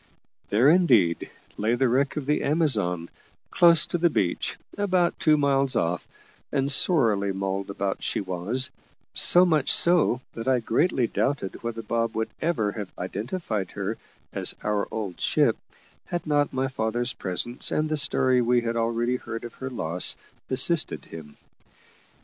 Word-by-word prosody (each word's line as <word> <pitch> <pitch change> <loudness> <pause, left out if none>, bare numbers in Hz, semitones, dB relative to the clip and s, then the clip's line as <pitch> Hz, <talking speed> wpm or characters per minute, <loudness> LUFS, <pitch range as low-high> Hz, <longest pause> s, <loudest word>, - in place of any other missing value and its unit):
There, 115 +6 +3
indeed, 125 - +3 0.3
lay 110 +3 +1
the 130 +1 +2
wreck 135 +5 0
of 145 - -3
the 150 +2 0
Amazon, 105 - 0 0.4
close 170 -3 +5
to 175 - -3
the 170 +1 +3
beach, 95 - -1 0.2
about 185 -4 0
two 155 -1 +4
miles 140 -2 +1
off, 85 +1 -1 0.4
and 140 0 0
sorely 115 - +3
mauled 95 0 -3
about 100 0 -3
she - - -2
was; 100 +7 -1 0.4
so 180 +1 +6
much 155 -6 +2
so, 170 -7 +4
that 115 +2 -7
I 130 -1 +3
greatly 125 +3 +1
doubted 130 -4 -2
whether 115 -1 -5
Bob 115 +1 -2
would 110 0 -2
ever 150 -11 0
have 100 -3 -7
identified 110 - -4
her - - -3 0.4
as - - +1
our 105 -1 -1
old 100 -5 -5
ship, - - +2 0.5
had 175 -1 -4
not 145 -2 +1
my 130 +1 -1
father's 120 0 -2
presence, 105 +7 -3
and 155 - 0
the 155 - -1
story 130 -4 +1
we 120 0 +2
had 115 0 -3
already 115 +2 0
heard 115 -1 -7
of 120 - -8
her 130 - -3
loss, 90 -8 0 0.3
assisted 155 +5 +2
him. 75 -3 -11
120 Hz, 155 wpm, -25 LUFS, 105-145 Hz, 0.5 s, so